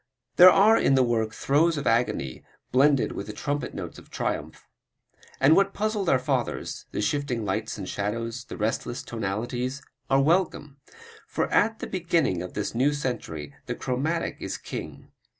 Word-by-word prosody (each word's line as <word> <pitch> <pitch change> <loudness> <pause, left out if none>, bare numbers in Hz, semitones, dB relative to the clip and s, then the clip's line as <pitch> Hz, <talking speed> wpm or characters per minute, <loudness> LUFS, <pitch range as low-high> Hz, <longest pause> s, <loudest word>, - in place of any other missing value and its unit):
There 180 +1 +11
are 210 +4 +6
in 135 - +3
the 130 - +5
work 115 -2 0
throes 155 +8 +2
of 140 - -3
agony 115 - 0 0.3
blended 140 +1 +4
with 100 - -6
the 105 - -6
trumpet 145 +6 -3
notes - - -6
of - - -17
triumph. - - -4 0.7
And 145 +4 +6
what 195 0 +2
puzzled 210 -3 0
our 130 - +5
fathers 130 -2 -2
the - - -2
shifting 125 -2 -1
lights 110 +3 -2
and 95 -3 -6
shadows, 115 +5 -3
the - - -8
restless 110 +3 -2
tonalities 120 +5 -3 0.3
are 135 - +4
welcome, 155 -3 +1 0.5
for - - -1
at 225 0 +3
the - - -5
beginning 170 - 0
of 90 - -7
this 105 - -2
new 135 +5 +2
century 80 - -4
the - - -2
chromatic 150 +7 -2
is - - -4
king. - - -8
130 Hz, 165 wpm, -26 LUFS, 110-150 Hz, 0.7 s, There